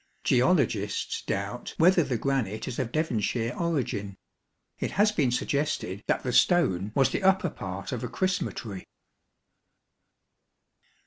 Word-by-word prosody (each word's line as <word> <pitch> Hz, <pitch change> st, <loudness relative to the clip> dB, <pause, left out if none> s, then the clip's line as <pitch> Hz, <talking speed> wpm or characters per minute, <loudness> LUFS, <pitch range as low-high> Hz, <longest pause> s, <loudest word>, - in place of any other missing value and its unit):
Geologists 125 Hz, -, +1 dB
doubt -, -, -4 dB
whether 180 Hz, +2 st, +5 dB
the 130 Hz, -4 st, -1 dB
granite 110 Hz, -5 st, -1 dB
is 120 Hz, -, -4 dB
of 115 Hz, -, -2 dB
Devon 155 Hz, -7 st, 0 dB
shire 115 Hz, +3 st, -1 dB
origin. 125 Hz, -, -2 dB, 0.6 s
It -, -, -1 dB
has 210 Hz, +1 st, +5 dB
been 150 Hz, -11 st, +1 dB
suggested 125 Hz, -6 st, -1 dB
that -, -, +1 dB
the 125 Hz, -, -2 dB
stone 105 Hz, -, +3 dB
was 135 Hz, -1 st, +3 dB
the -, -, -1 dB
upper 190 Hz, -3 st, +3 dB
part 95 Hz, +1 st, -6 dB
of 125 Hz, -3 st, -3 dB
a -, -, -2 dB
Chrisrnatory. 120 Hz, -, -3 dB
125 Hz, 130 wpm, -27 LUFS, 105-165 Hz, 0.6 s, whether